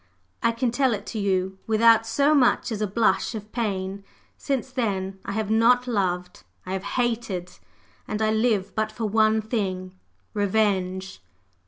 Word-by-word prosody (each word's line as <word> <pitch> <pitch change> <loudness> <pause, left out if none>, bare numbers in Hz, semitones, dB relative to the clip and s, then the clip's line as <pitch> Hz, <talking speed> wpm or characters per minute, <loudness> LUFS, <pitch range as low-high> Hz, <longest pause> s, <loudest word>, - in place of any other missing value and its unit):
I 230 - +3
can 230 +1 -1
tell 255 -1 +2
it 205 0 -8
to 220 - -3
you 190 -1 0
without 225 0 +5
so 285 +2 +3
much 250 -3 +3
as 215 -1 -3
a 210 - +1
blush 225 +3 +1
of 215 0 -8
pain! 195 -4 -3 0.3
Since 265 -2 -3
then 195 -6 -2
I - - -4
have 215 0 -2
not 240 +3 +4
loved, 180 -6 -2 0.2
I 185 - -4
have 190 - -2 0.2
hated; 225 -7 -1 0.6
and 215 - -3
I 215 0 +2
live 220 -3 +1
but 215 0 -1
for 220 +1 -4
one 220 +1 +3
thing 190 -5 -3 0.4
Revenge." 190 - 0
215 Hz, 160 wpm, -25 LUFS, 190-230 Hz, 0.6 s, without